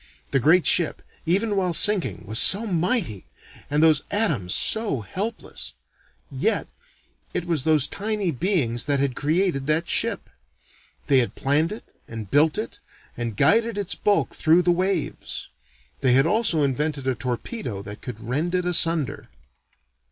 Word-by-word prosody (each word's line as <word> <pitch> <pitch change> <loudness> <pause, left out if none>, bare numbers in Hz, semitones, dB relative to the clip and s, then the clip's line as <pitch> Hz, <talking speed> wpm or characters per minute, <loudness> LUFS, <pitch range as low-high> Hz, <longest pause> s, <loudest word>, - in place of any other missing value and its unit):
The 135 - +2
great 160 +5 +4
ship, 170 +3 +2 0.2
even 200 +5 +1
while 180 -3 0
sinking, 205 -1 +2
was 110 +3 -1
so 205 +4 +4
mighty, 175 - -1 0.4
and 150 +2 +1
those 155 -3 +5
atoms 205 - 0
so 215 - +3
helpless. 200 - -6 0.6
Yet, - - -1 0.7
it 175 - -2
was 165 -6 -1
those 155 -3 +3
tiny 205 -3 -2
beings 135 - 0
that 145 -1 +1
had 135 -2 -1
created 155 -1 0
that 155 +2 +1
ship. - - -1 0.8
They 135 -2 +4
had 120 - -1
planned 150 +6 +1
it 215 - -7 0.2
and 110 -4 -8
built 150 +2 +3
it 215 - -5 0.4
and 115 -4 -5
guided 230 0 +3
its 200 -3 -2
bulk 205 -1 0
through 165 +2 +3
the 175 - +3
waves. 185 +3 -2 0.5
They 125 - +2
had 135 +2 +4
also 215 -8 +1
invented 140 +1 -1
a 130 - +2
torpedo 125 - -5
that 105 +1 -9
could 120 -4 -8
rend 155 +8 -1
it 180 -1 -1
asunder. 165 -4 0
160 Hz, 150 wpm, -23 LUFS, 135-195 Hz, 0.8 s, those